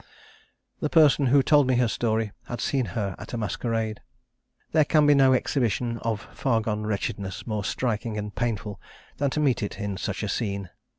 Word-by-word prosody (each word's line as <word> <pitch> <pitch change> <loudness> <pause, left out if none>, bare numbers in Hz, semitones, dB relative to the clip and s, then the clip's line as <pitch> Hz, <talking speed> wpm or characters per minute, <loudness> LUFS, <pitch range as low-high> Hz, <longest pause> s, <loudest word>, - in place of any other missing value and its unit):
"The 150 - -1
person 145 -4 +5
who 135 +2 +5
told 145 -2 +4
me 130 - +3
her 120 0 +3
story 110 -1 0 0.2
had 120 - -5
seen 135 -3 0
her 100 -3 -1
at - - -9
a - - -1
masquerade. 110 +1 -2 0.7
There 155 -1 +5
can 150 +1 +3
be 145 - +6
no 135 -2 +5
exhibition 120 -3 0
of 110 -2 -2
far 120 -4 +1
gone 105 -1 -2
wretchedness 100 -2 -3
more 105 -3 -2
striking 115 -1 -2
and 105 0 -4
painful 105 -4 -3 0.4
than 140 0 +1
to 150 - -2
meet 140 -6 +2
it 105 - -4
in 100 -1 -3
such 100 +2 -3
a - - -1
scene. 100 -4 -3
115 Hz, 185 wpm, -26 LUFS, 105-130 Hz, 0.7 s, be